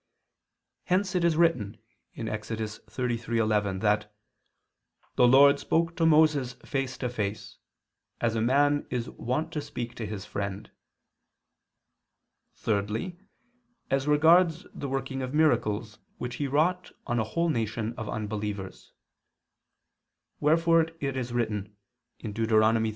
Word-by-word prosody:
Hence 185 +2 +1
it 180 -2 +1
is 170 -2 +3
written 125 -12 +2 0.4
(Ex. 110 -2 -4
33:11) 110 -2 -1
that 105 0 +1 1.0
"the 125 - +5
Lord 140 +3 +7
spoke 165 0 0
to 165 -2 +3
Moses 150 -5 +4
face 135 -2 -2
to 125 - -2
face, 105 -4 -4 0.6
as 115 -2 +1
a 110 - 0
man 145 +4 +2
is 120 -1 -3
wont 150 +8 -2
to 150 - -3
speak 120 -4 -6
to 110 - -4
his 105 -1 -6
friend." 100 +1 -5 1.8
Thirdly, 110 - -2 0.7
as 135 +1 +1
regards 165 +3 +4
the 140 - -5
working 135 0 -3
of 130 +2 -4
miracles 110 -8 +1 0.2
which 125 0 -5
he 145 - -1
wrought 165 +6 +1
on 120 0 0
a - - +2
whole 170 +10 -1
nation 115 -3 -2
of 110 -2 -6
unbelievers. 105 -2 -5 1.5
Wherefore 165 +2 +4
it 135 -1 -2
is 125 -2 -3
written 105 -4 -2 0.5
(Deut. 110 +1 -2
125 Hz, 120 wpm, -28 LUFS, 110-150 Hz, 1.8 s, Lord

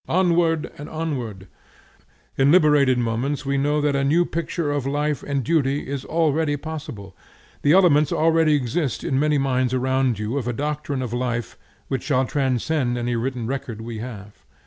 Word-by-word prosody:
Onward 170 -3 +2
and 150 - -7
onward! 125 -12 -4 0.9
In 135 +1 +4
liberated 150 -6 +5
moments 125 +5 -1
we 140 0 0
know 145 +2 +1
that 145 -1 +1
a 140 - +1
new 165 +5 +3
picture 165 -2 -2
of 145 -2 -1
life 145 +1 -1
and 140 -2 -2
duty 145 -1 0
is 140 -1 -4
already 155 -2 +1
possible; 145 - -7 0.5
the 145 - +4
elements 155 -5 +5
already 160 -1 +3
exist 140 0 -1
in 135 - 0
many 150 0 +2
minds 130 -2 +1
around 130 -2 +1
you 110 +6 -2
of 125 - -5
a 120 - -1
doctrine 145 0 -3
of 120 -2 -5
life 120 -2 -2 0.3
which 135 -2 -2
shall 130 -2 +1
transcend 130 -1 0
any 120 0 -1
written 125 0 -2
record 125 -3 -4
we 115 0 -6
have. 105 -4 -9
140 Hz, 170 wpm, -23 LUFS, 125-150 Hz, 0.9 s, liberated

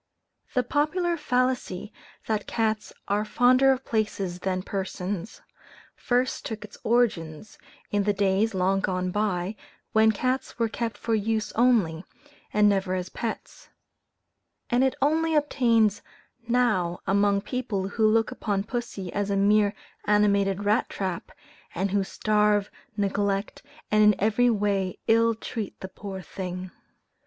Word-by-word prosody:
The 250 - +3
popular 330 +7 0
fallacy, 250 - -1 0.3
that 215 -2 -2
cats 220 -2 -1 0.2
are 205 +1 +1
fonder 255 +5 +4
of 265 0 -2
places 200 -5 -2
than 185 0 -2
persons, 190 0 -4 0.5
first 250 +1 0
took 215 -2 -5
its 205 - -14
origin 205 -9 +1 0.5
in 205 - +2
the 210 - +3
days, 200 +1 +1
long 190 +1 +2
gone 185 -1 -1
by, 200 -1 -1 0.4
when 220 0 +5
cats 255 +5 -2
were 230 -1 +1
kept 230 -1 -3
for 230 - -2
use 220 0 0
only, 215 -9 +2 0.5
and 210 0 +4
never 195 -2 +1
as 180 -1 -3
pets; 230 - -6 1.0
and 245 +2 +3
it 265 - +2
only 320 +2 +2
obtains 230 -8 +2 0.5
now 215 -8 +1
among 200 0 +3
people 200 -6 -3
who 220 +1 +2
look 225 +2 +2
upon 205 -6 -2
pussy 220 -5 -5
as 205 0 -1
a 200 - +1
mere 205 +1 +3 0.3
animated 200 -1 +2
rat 210 +3 +2
trap, 185 -3 -4 0.4
and 190 +2 -1
who 200 0 +2
starve, 210 0 +1 0.3
neglect, 200 0 -1 0.3
and 215 0 +5
in 210 -1 +6
every 220 +4 +3
way 200 -4 0
ill 230 0 +3
treat 220 -1 -6
the 190 - -6
poor 190 -1 -8
thing. 185 -1 -6
210 Hz, 135 wpm, -26 LUFS, 195-230 Hz, 1.0 s, in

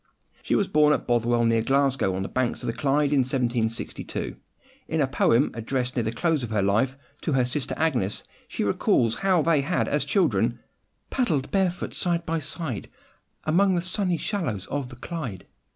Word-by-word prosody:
She - - 0
was 200 - +2
born 150 0 +4
at - - -1
Bothwell, 120 0 +2
near 115 -1 +3
Glasgow, 135 -6 +2
on 95 - -2
the - - -3
banks 130 -2 -1
of - - -4
the 115 - -1
Clyde, 145 +2 +1
in 140 - +4
1762. 120 -3 -2 0.5
In 160 - -1
a 145 - +4
poem 130 -1 +2
addressed, 125 +2 -2
near 125 - +2
the 110 -1 -1
close 160 +5 +1
of 120 - -4
her 105 -3 +1
life, 110 +7 +1 0.2
to 155 - -1
her 130 -2 +3
sister 135 +2 -2
Agnes, 125 -12 0 0.2
she - - -3
recalls 115 -1 +2
how 185 -4 +3
they 160 -3 +3
had 165 +6 0
as - - +1
children—... - - +1 0.5
paddled 160 - 0
barefoot 185 -2 0
side 170 -1 0
by 165 0 -1
side, 145 - -4 0.5
Among 185 +4 +3
the 175 - +1
sunny 185 -1 0
shallows 150 - -2
of 140 -3 -2
the 120 - -10
Clyde. 125 - -6
135 Hz, 185 wpm, -25 LUFS, 120-165 Hz, 0.5 s, born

